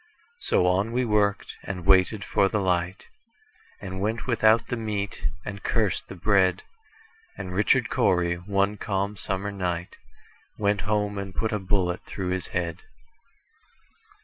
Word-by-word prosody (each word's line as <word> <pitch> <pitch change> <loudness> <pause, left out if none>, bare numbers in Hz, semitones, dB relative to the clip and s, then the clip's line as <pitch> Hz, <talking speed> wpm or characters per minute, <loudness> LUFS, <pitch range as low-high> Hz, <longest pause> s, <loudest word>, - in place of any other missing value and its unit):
So 90 - +2
on 95 +5 +2
we 125 +1 +1
worked, 105 -2 +1
and 90 -3 -6
waited 95 +2 +4
for 100 - +3
the 105 - 0
light, 90 0 -1 0.7
And 95 -2 -6
went 110 +3 -1
without 115 -2 +4
the - - 0
meat, 105 -3 -3 0.2
and 100 -1 -6
cursed 110 -3 0
the - - -8
bread; 95 0 +2 0.7
And 90 - -5
Richard 100 +3 +2
Cory, 90 -1 +2
one 100 +3 0
calm 100 0 -2
summer 100 +1 -3
night, 90 -3 -3 0.6
Went 100 -1 +1
home 105 -1 0
and 100 -1 -6
put 110 - 0
a 105 - 0
bullet 95 -2 0
through 95 -2 -4
his 95 -1 -2
head. 85 -2 -2
100 Hz, 145 wpm, -26 LUFS, 95-105 Hz, 0.7 s, waited